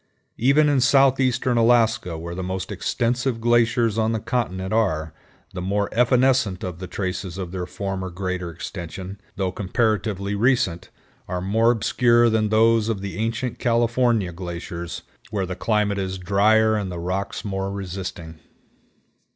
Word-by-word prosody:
Even 140 +5 +4
in 140 -3 +3
southeastern 130 -2 +3
Alaska, 115 -6 +3
where 85 +1 -6
the 90 - -4
most 95 0 -4
extensive 120 +1 -1
glaciers 115 -1 +2
on 110 +1 +1
the 110 - -1
continent 95 -5 -2
are, 80 -8 0 0.4
the 90 - -5
more 100 +2 0
evanescent 125 -4 +2
of 90 -2 -5
the 95 - -6
traces 95 -1 -4
of 90 -3 -5
their 90 -1 -4
former 95 0 -4
greater 90 -1 -3
extension, 90 +4 -7
though 95 -2 -1
comparatively 100 0 -1
recent, 100 -6 +1 0.4
are 90 0 -3
more 110 +5 +2
obscure 120 0 +3
than 110 -1 +1
those 115 0 +3
of 105 -4 -2
the 100 0 -5
ancient 115 +2 -2
California 120 -4 +2
glaciers 85 -1 -6 0.3
whore 100 -4 -1
the 90 - -4
climate 105 0 0
is 95 0 -3
drier 110 +4 +3
and 100 -3 -2
the 90 - -5
rocks 95 +5 -3
more 95 -1 -2
resisting. 90 -4 -6
100 Hz, 145 wpm, -23 LUFS, 95-115 Hz, 0.4 s, Even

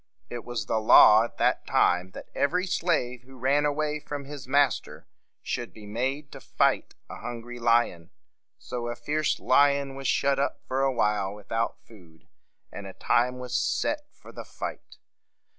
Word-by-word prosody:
It 120 -1 -5
was 120 -4 -4
the 110 - 0
law 110 0 +7
at - - -11
that - - +1
time 90 +1 +2
that - - -9
every 180 +6 +1
slave 160 -9 -1
who 130 +1 -16
ran 140 +4 +2
away 150 +1 -1
from 145 -1 -6
his 140 -2 -9
master 140 -1 +1 0.4
should 120 -1 -4
be 105 - -12
made 130 +7 -3
to - - -10
fight - - 0
a - - -9
hungry 120 0 -7
lion. 115 -8 +1 0.5
So 120 - -5
a 120 - -3
fierce 150 +6 -1
lion 140 +1 +3
was 135 0 -5
shut 140 0 +2
up 140 - -1
for 130 +1 -1
a 135 0 +2
while 105 -4 0
without 115 +2 -3
food, 85 -8 -18 0.4
and - - -8
a - - -9
time 125 +2 +1
was 125 -1 -5
set 295 - 0
for - - -15
the - - -8
fight. - - -8
125 Hz, 170 wpm, -27 LUFS, 115-140 Hz, 0.5 s, law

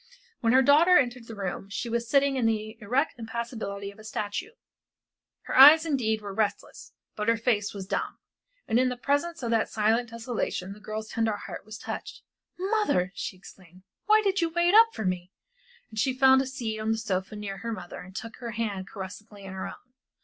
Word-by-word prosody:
When 230 -1 +2
her 260 +1 +6
daughter 320 +7 +6
entered 245 -3 0
the 225 - -8
room 195 -1 -5
she 200 +4 -4
was 235 0 -2
sitting 280 0 +3
in 245 -3 +2
the 215 0 -2
erect 255 +6 0
impassibility 225 -3 -5
of 200 - -19
a - - -12
statue. 215 - -4 0.9
Her - - -4
eyes 300 +5 +10
indeed 225 -8 0
were 200 -1 -6
restless, 210 0 -3 0.2
but 210 0 -3
her 230 0 +4
face 220 -3 0
was 195 -2 -7
dumb, - - -3 0.5
and 230 - +3
in 255 0 +3
the 250 - -4
presence 285 +4 -1
of 235 - -1
that 225 -1 +2
silent 225 +2 +1
desolation, 225 -5 -3
the 210 - -14
girl's 215 +1 -6
tender 225 -2 0
heart - - -8
was 215 0 -8
touched. - - -7 0.3
"Mother!" 375 - +1
she 185 - -5
exclaimed, 185 -1 -16 0.2
"why 430 +1 +6
did 390 -2 +1
you 335 - +1
wait 345 +2 +2
up 450 +2 +9
for 220 - -5
me?" 185 0 -2 0.6
And 220 - -5
she 255 +3 +1
found 265 0 +6
a 270 - -3
seat 235 -5 -4
on 215 +1 -1
the 225 - +1
sofa 195 -2 -3
near 205 -2 -5
her 230 +3 -5
mother 175 -6 -7
and 185 +1 -12
took 230 +2 -7
her 235 -2 -6
hand 205 -4 -3
caressingly 200 +1 -9
in 190 -1 -8
her 190 - -4
own. 250 - -12
225 Hz, 205 wpm, -27 LUFS, 205-260 Hz, 0.9 s, eyes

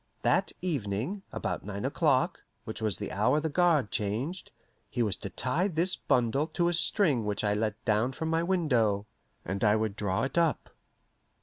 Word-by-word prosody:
That - - +2
evening, 140 - -2
about - - -3
nine 100 +2 -5
o'clock, 140 -2 +1 0.2
which 110 - -7
was 105 -5 0
the 105 - -5
hour 125 +9 +2
the 160 +1 -2
guard 160 - +3
changed, 120 - -2 0.4
he 120 - 0
was 105 -5 0
to 100 - -6
tie 130 - 0
this 180 +1 +1
bundle 125 +5 +1
to 170 +2 0
a - - 0
string 165 - +2
which 105 0 -2
I 105 -1 +2
let 105 0 -2
down 110 +4 +2
from 160 - -4
my 165 0 +2
window, 125 - +1 0.4
and 95 +4 -3
I 105 -1 +5
would 110 -2 -1
draw 95 -3 -1
it 135 +5 0
up. 165 -3 0
125 Hz, 180 wpm, -29 LUFS, 105-165 Hz, 0.4 s, I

